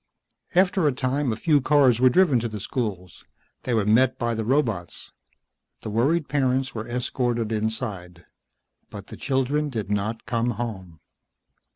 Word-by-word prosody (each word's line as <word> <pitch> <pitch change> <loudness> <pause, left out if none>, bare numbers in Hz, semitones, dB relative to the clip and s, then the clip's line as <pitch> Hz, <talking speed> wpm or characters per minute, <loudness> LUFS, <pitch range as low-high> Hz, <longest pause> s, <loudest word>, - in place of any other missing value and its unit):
After 185 -2 +3
a - - +3
time 130 +1 -1
a - - -1
few 150 +3 +2
cars 130 -4 +4
were 130 - +7
driven 150 -3 +4
to 115 0 -3
the 105 -1 -6
schools. 95 -6 -4 0.4
They 125 - 0
were 105 -3 +1
met 120 +4 +3
by 120 -1 -1
the 110 0 -2
robots. 115 -8 -1 0.7
The 110 - -6
worried 145 +9 +1
parents 130 -2 0
were 110 +1 -6
escorted 120 -2 -1
inside. 105 -6 -4 0.6
But 100 -1 -9
the - - -8
children 140 +2 -1
did 110 -6 -4
not 105 +3 -2
come 115 +1 0
home. 95 -9 -6
120 Hz, 155 wpm, -24 LUFS, 110-135 Hz, 0.7 s, were